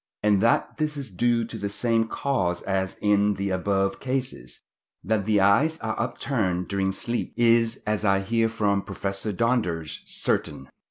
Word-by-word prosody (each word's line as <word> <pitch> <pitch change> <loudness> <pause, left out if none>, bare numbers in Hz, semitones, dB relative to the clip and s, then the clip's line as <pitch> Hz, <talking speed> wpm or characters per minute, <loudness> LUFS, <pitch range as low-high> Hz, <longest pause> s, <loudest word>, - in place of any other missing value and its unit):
and 105 -2 +3
that 115 +1 +2
this 155 -1 -1
is 135 -6 -6
due 115 +4 +1
to 110 0 -8
the 100 - -2
same 115 +1 +1
cause 95 -11 -1
as 95 -1 -2
in 105 0 +3
the 100 0 -2
above 95 +1 0
cases. 130 - -4 0.4
That 110 -3 0
the 105 -1 +3
eyes 135 +12 +3
are 110 0 -2
upturned 110 -7 -1
during 95 -1 0
sleep 120 +5 -3
is, 115 0 +3
as 105 0 -1
I 100 -1 +3
hear 115 +3 +1
from 105 -3 +1
Professor 100 +1 -4
Donders, 95 -8 -1
certain. 65 - -1
105 Hz, 160 wpm, -25 LUFS, 95-115 Hz, 0.4 s, and